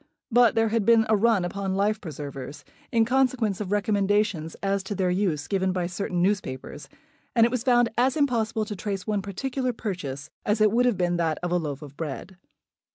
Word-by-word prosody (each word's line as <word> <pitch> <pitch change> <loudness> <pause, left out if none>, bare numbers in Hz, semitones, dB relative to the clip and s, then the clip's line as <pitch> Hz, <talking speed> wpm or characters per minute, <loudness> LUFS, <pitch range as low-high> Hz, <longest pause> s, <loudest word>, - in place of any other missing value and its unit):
But 240 -1 +5
there 225 0 +3
had 225 -1 +1
been 230 +1 +5
a 220 - +5
run 215 -3 +3
upon 190 +1 -3
life 210 +2 +1
preservers, 145 -4 -7 0.3
in 230 -3 +3
consequence 245 -5 +1
of 195 -2 -4
recommendations 205 -5 +1
as 195 0 +1
to 205 - -4
their 185 -1 +1
use 180 -6 0
given 190 -2 0
by 180 -1 -1
certain 180 0 -2
newspapers; 180 -9 -2 0.5
and 230 -1 +6
it 235 - 0
was 250 -2 -1
found 240 -1 +3
as 260 +3 +2
impossible 225 -6 +1
to 210 -1 -5
trace 195 -1 -4
one 210 -2 0
particular 250 +6 -3
purchase 155 - -5
as 210 +1 +1
it 215 -1 +5
would 240 -2 +2
be 180 - +1
that 170 -3 0
of 175 - -2
a 180 - +3
loaf 150 -3 -4
of 145 -1 -11
bread. 165 +4 -6
200 Hz, 195 wpm, -26 LUFS, 175-225 Hz, 0.5 s, and